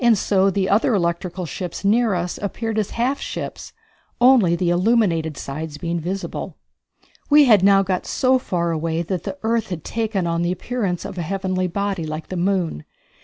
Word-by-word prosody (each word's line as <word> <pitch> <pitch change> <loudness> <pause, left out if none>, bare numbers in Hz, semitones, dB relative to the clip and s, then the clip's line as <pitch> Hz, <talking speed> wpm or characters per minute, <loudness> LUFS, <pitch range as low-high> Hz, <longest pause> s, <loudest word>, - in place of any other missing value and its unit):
So 195 -1 +2
the 190 0 0
other 215 +4 +3
electrical 175 0 -2
ships 175 +4 -6
near 220 0 +3
us 175 0 -3
appeared 220 +2 -2
as 210 - -1
half 255 +4 -1
ships, - - -6 0.5
only 245 -9 +5
the 175 0 0
illuminated 175 - +2
sides 150 +2 -6
being 170 +3 -2
visible. 185 +4 -5 0.7
We 295 0 +7
had 215 -7 +6
now 195 0 +6
got 185 -1 -2
so 260 0 +2
far 170 -7 -1
away 165 +1 -1
that 180 0 -4
the 190 -1 -4
earth 225 -1 0
had 170 -5 -5
taken 215 -5 -2
on 170 0 0
the 175 +1 0
appearance 185 -1 -3
of 185 - -6
a - - -1
heavenly 185 +1 -1
body 195 -2 -2
like 155 +1 -6
the 185 - -4
moon. 175 - 0
185 Hz, 175 wpm, -21 LUFS, 170-210 Hz, 0.7 s, We